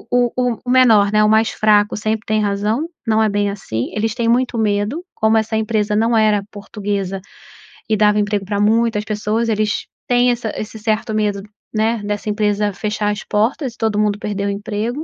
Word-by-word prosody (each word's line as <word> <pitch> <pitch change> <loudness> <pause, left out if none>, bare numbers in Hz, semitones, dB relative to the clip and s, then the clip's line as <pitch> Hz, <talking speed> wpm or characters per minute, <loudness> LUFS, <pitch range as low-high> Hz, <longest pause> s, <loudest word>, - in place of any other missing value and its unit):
o - - -18
o 245 -1 +2
o 250 -2 0
o - - -2
menor, 225 -6 +5
né, 215 0 +4
o - - +4
mais 220 +1 +3
fraco 210 -1 +2
sempre 220 +1 -2
tem 215 0 +1
razão, 210 +9 -1 0.2
não 220 0 +3
é 220 - +3
bem 205 0 0
assim, 120 - -4
eles 220 +1 -1
têm 235 -1 -1
muito 245 0 +1
medo, 215 - 0
como 220 0 +2
essa 220 0 -1
empresa 215 -1 0
não 230 +1 +2
era 215 -2 +3
portuguesa 200 -2 -4 0.7
e 215 - +2
dava 210 0 +3
emprego 205 -1 -1
pra 205 +1 -2
muitas 220 0 +2
pessoas, 215 +2 -1
eles 215 0 -1 0.2
têm 245 0 +3
essa 235 -2 -3
esse 215 +1 -6
certo 220 0 -1
medo, 210 -2 0 0.3
né, 220 +1 0
dessa 205 +1 -3
empresa 210 -1 0
fechar 210 +1 -2
as 205 - -5
portas 230 +4 -1
e - - -22
todo 220 -2 0
mundo 210 -1 +1
perder 200 -2 -3
o - - 0
emprego, 215 +7 -3
215 Hz, 200 wpm, -18 LUFS, 205-225 Hz, 0.7 s, menor